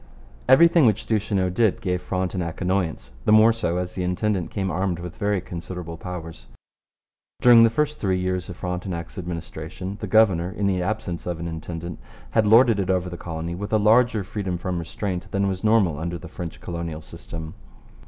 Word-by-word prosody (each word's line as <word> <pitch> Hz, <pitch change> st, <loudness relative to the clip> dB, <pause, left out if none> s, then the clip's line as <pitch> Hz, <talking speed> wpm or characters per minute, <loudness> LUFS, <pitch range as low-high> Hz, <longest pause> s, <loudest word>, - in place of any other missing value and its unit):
Everything 165 Hz, +1 st, +7 dB
which 105 Hz, -2 st, +1 dB
Duchesneau 100 Hz, -4 st, 0 dB
did 110 Hz, +2 st, +2 dB
gave 90 Hz, -2 st, -1 dB
Frontenac 90 Hz, -2 st, -3 dB
annoyance 90 Hz, -9 st, -1 dB
the -, -, +3 dB
more 110 Hz, +1 st, +7 dB
so 100 Hz, -7 st, -1 dB
as 90 Hz, 0 st, -3 dB
the 95 Hz, -, -4 dB
intendant 90 Hz, 0 st, -1 dB
came 95 Hz, -3 st, -2 dB
armed 90 Hz, +1 st, -1 dB
with 90 Hz, 0 st, -7 dB
very 105 Hz, -2 st, 0 dB
considerable 85 Hz, -1 st, -7 dB
powers. 80 Hz, -7 st, -8 dB, 0.9 s
During 120 Hz, -2 st, +8 dB
the 115 Hz, -, +6 dB
first 150 Hz, +5 st, -1 dB
three 95 Hz, -3 st, 0 dB
years 90 Hz, 0 st, -2 dB
of 90 Hz, -, -7 dB
Frontenac's 90 Hz, 0 st, -4 dB
administration 85 Hz, +2 st, -6 dB
the 105 Hz, -, -3 dB
governor, 95 Hz, -5 st, +4 dB
in 105 Hz, +1 st, -3 dB
the 95 Hz, -2 st, +1 dB
absence 90 Hz, -4 st, -3 dB
of 85 Hz, -2 st, -3 dB
an 85 Hz, -, -4 dB
intendant, 85 Hz, +1 st, -6 dB, 0.3 s
had 110 Hz, -2 st, +3 dB
lorded 115 Hz, 0 st, +6 dB
it 95 Hz, -2 st, -1 dB
over 90 Hz, -1 st, 0 dB
the -, -, -5 dB
colony 85 Hz, 0 st, -5 dB
with 100 Hz, +4 st, -5 dB
a 110 Hz, -, +4 dB
larger 110 Hz, +1 st, +4 dB
freedom 95 Hz, -2 st, -3 dB
from 90 Hz, 0 st, -3 dB
restraint 90 Hz, +2 st, -4 dB
than 100 Hz, 0 st, 0 dB
was 95 Hz, 0 st, -3 dB
normal 105 Hz, -9 st, +3 dB
under 85 Hz, +2 st, -3 dB
the 90 Hz, -, -10 dB
French 85 Hz, 0 st, -7 dB
colonial 85 Hz, -3 st, -5 dB
system. 80 Hz, -1 st, -8 dB
90 Hz, 185 wpm, -24 LUFS, 85-105 Hz, 0.9 s, During